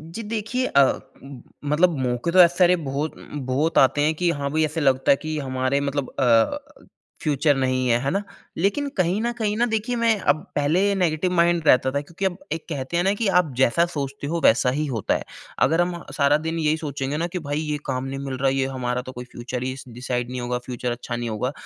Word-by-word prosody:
जी 230 - -4
देखिए 230 +4 -1
अ, 140 - +5 0.8
मतलब 155 +3 +2
मौके 125 +7 -1
तो 185 - +4
ऐसे 175 0 +5
सारे 180 -1 +5
बहुत 145 +3 -2
उ - - -14
उम, 150 - -7
बहुत 140 +6 0
आते 145 - -3
हैं 155 +2 +2
कि 175 +2 +1
हाँ 140 0 -2
भाई 155 +1 +2
ऐसे 155 +2 -3
लगता 135 -2 +3
है - - +6
कि 155 0 -2
हमारे 130 0 -1
मतलब 140 -2 -3
अ, 115 -4 +4 0.6
फ़्यूचर 145 0 +2
नहीं 130 -1 0
है, 120 -1 +4
है 135 +2 -1
ना? 195 - 0 0.4
लेकिन 200 - 0
कहीं 185 +3 +1
न 235 +1 0
कहीं 210 -2 0
ना 240 - +3
देखिए 225 +1 -1
मैं 230 -2 +2
अब 155 +2 -4
पहले 175 +8 +2
नेगेटिव 180 -1 0
माइंड 170 -1 +3
रहता 130 +1 +5
था 140 +1 -1
क्योंकि 170 +6 -5
अब 180 -2 -1
एक 160 +1 -3
कहते 145 +1 -3
हैं 175 - +2
ना 195 +2 +2
कि 215 +1 -1
आप 165 -5 -1
जैसा 130 +6 +3
सोचते 140 -1 -4
हो 165 +2 -2
वैसा 125 +2 +4
ही 150 +4 -1
होता 115 -6 -1
है। - - -3 0.4
अगर 165 +2 +2
हम 175 -1 -2
सारा 145 0 +4
दिन 160 +2 -3
यही 155 0 +1
सोचेंगे 145 -2 -3
ना 170 +2 -1
कि 180 +1 -4
भई 145 +1 -1
ये 150 -1 -2
काम 130 0 -2
नहीं 135 0 -5
मिल 135 -1 -4
रहा 135 +1 +2
ये 135 0 +1
हमारा 125 -2 -2
तो 130 - -9
कोई 125 -1 -8
फ़्यूचर 125 +1 -6
ही 130 0 -3
स - - -9
डिसाइड 125 0 -3
नहीं 125 0 -4
होगा 120 0 -2
फ़्यूचर 125 -1 -3
अच्छा 120 0 -5
नहीं 120 0 -3
होगा। 110 +4 -2
145 Hz, 235 wpm, -23 LUFS, 130-175 Hz, 0.8 s, है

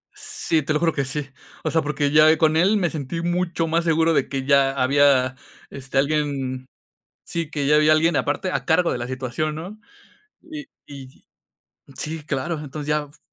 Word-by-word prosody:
Sí, 160 - -1
te 150 +1 -2
lo 150 - +1
juro 165 -1 +1
que 140 - -1
sí. 140 +2 -4 0.4
O - - -1
sea, 160 - +2
porque 145 -1 -1
ya, 155 +1 +6
eh, 160 - +4
con 155 -1 +2
él 190 +6 +3
me 180 -4 0
sentí 155 +1 -4
mucho 175 -1 -1
más 165 +1 +1
seguro 165 0 +2
de 140 - 0
que 135 -1 -3
ya 140 -1 +4
había, 135 -1 +3 0.3
este, 135 -1 -6
alguien 140 -3 -1 0.6
Sí, 165 -2 -4
que 145 -2 -2
ya 150 +1 +4
había 150 0 +5
alguien 160 +2 +3
aparte 185 - -1
a - - -2
cargo 170 +1 +2
de - - -2
la 120 - -4
situación, 130 +4 -3
¿no? 180 +7 -8 0.6
Y 310 -3 -9 0.2
y 135 -2 -12 0.7
sí, 155 0 -4
claro. 150 +3 -3
Entonces, 150 0 -7
ya 150 0 +1
f 145 - -22
150 Hz, 195 wpm, -22 LUFS, 140-165 Hz, 0.7 s, ya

